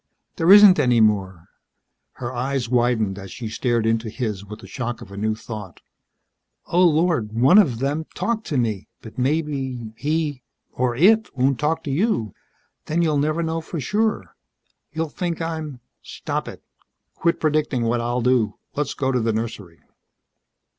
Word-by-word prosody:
"There 170 0 +4
isn't 205 -2 +9
any 125 -2 +3
more." 95 -5 +1 0.7
Her 120 0 -6
eyes 130 0 -2
widened 115 -5 +1
as 95 -1 -9
she 115 +2 -6
stared 115 0 0
into 115 0 0
his 105 -4 -4
with 105 +1 -10
the - - -11
shock 120 -2 -4
of 100 - -12
a - - -9
new 110 +2 -1
thought. 105 -5 -8 0.9
"Oh, 180 +2 +2
Lord! 160 -9 +2
One 130 - +6
of 135 - +3
them 145 +5 -2
talked 230 -1 -2
to 145 - -1
me, 110 -5 -1 0.2
but 110 +2 -9
maybe 130 -5 -2
he 150 0 -2 0.3
or 125 -1 -1
it 215 - +4
won't 130 -1 +2
talk 155 +2 0
to 145 - -4
you. 155 - 0 0.5
Then 170 +3 +1
you'll 155 -3 +1
never 155 +3 0
know 165 0 -2
for 160 +1 -6
sure! 210 - -1 0.6
You'll 160 0 -2
think 170 +1 -3
I'm 160 -5 -4
..." - - -55
"Stop - - -4
it. - - -9 0.5
Quit 170 0 0
predicting 150 -5 0
what 115 +1 0
I'll 120 +1 -1
do. 120 -3 +2 0.2
Let's 145 -1 -2
go 135 -1 0
to 125 - +1
the 115 -1 0
nursery." 105 -6 -5
130 Hz, 165 wpm, -22 LUFS, 115-160 Hz, 0.9 s, isn't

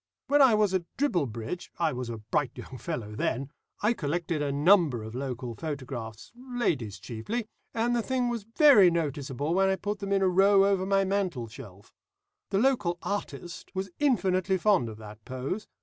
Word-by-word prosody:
When 290 +1 +4
I 255 -5 +7
was 210 -3 +2
at 185 -2 0
Dribblebridge 165 - -2
I 165 -3 +1
was 125 -1 -4
a 115 - -4
bright 115 +6 -2
young 130 - -9
fellow 120 -11 -4
then 135 +6 -2 0.3
I 215 +3 +4
collected 165 -2 -2
a 145 -1 0
number 145 - +4
of 110 0 -8
local 125 -2 -4
photographs, 125 -6 -6
ladies 240 - -2
chiefly, 170 - -4 0.3
and 235 +2 0
the 235 - +2
thing 255 +1 0
was 240 -2 -2 0.2
very 275 - +8
noticeable 145 -2 -2
when 190 +1 +3
I 190 - +2
put 205 +1 -4
them 200 -1 -4
in 195 -1 +3
a - - +4
row 195 +2 +5
over 195 -1 +1
my 195 0 +3
mantleshelf. 130 - -4 0.6
The 195 - 0
local 210 -7 +2
'artist' 175 -3 -5
was 190 0 -3
intensely 190 -9 +2
fond 185 - +2
of 110 - -9
that 105 0 -11
pose. 130 - -4
175 Hz, 175 wpm, -28 LUFS, 130-200 Hz, 0.6 s, very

